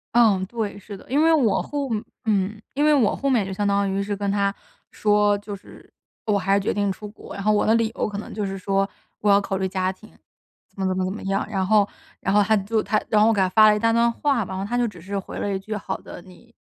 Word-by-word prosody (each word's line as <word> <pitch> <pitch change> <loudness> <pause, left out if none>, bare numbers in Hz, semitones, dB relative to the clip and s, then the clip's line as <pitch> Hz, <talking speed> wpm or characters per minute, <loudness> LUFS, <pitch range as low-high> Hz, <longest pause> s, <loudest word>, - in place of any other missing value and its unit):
嗯， 215 -6 +5
对， 220 -3 -4
是 200 0 -9
的， - - -16
因 285 +4 +2
为 325 - +5
我 255 -9 +3
后 285 -2 -3 0.4
嗯， 210 -1 0
因 290 +2 0
为 305 - +5
我 250 -8 +3
后 275 - -1
面 235 -7 +2
就 195 - -5
相 205 +2 -1
当 200 0 +1
于 195 +1 -1
是 200 +1 -2
跟 200 0 -2
他 200 -1 +1 0.4
说， 210 -1 +2
就 205 0 -7
是， 195 - -16 0.3
我 210 -3 +2
还 195 +1 +1
是 200 - +3
决 195 - -1
定 200 -1 0
出 210 +2 -7
国。 210 - -12
然 200 - -5
后 215 - +3
我 210 - +2
的 220 - +4
理 230 -1 +1
由 - - -1
可 205 - -5
能 210 - -7
就 210 - -3
是 195 0 -4
说， 195 +1 0 0.3
我 210 - +1
要 200 0 +6
考 195 -1 -3
虑 190 - -1
家 185 0 -1
庭， 215 +3 -15 0.6
怎 - - -18
么 190 - +1
怎 185 0 -1
么 185 - 0
怎 185 - -2
么 215 - -8
样， 195 +1 -1
然 195 -3 -1
后 210 0 +4 0.3
然 195 - 0
后， 210 - +5
他 215 +1 +3
就 215 +3 0
他 215 0 +1
然 210 -1 +3
后 215 - +6
我 225 - +4
给 205 - 0
他 190 - +4
发 215 +2 +7
了 210 - +4
一 - - -1
大 230 +1 +2
段 235 0 +3
话。 275 -1 0
然 190 - -6
后 195 - -3
他 235 +4 -3
就 240 - +2
只 180 -5 -9
是 195 +4 -5
回 190 - -8
了 200 - -2
一 190 - -2
句， 215 +3 -5
“好 200 - -4
的， - - -11
你， 190 +6 -18
205 Hz, 310 characters per minute, -23 LUFS, 195-220 Hz, 0.6 s, 发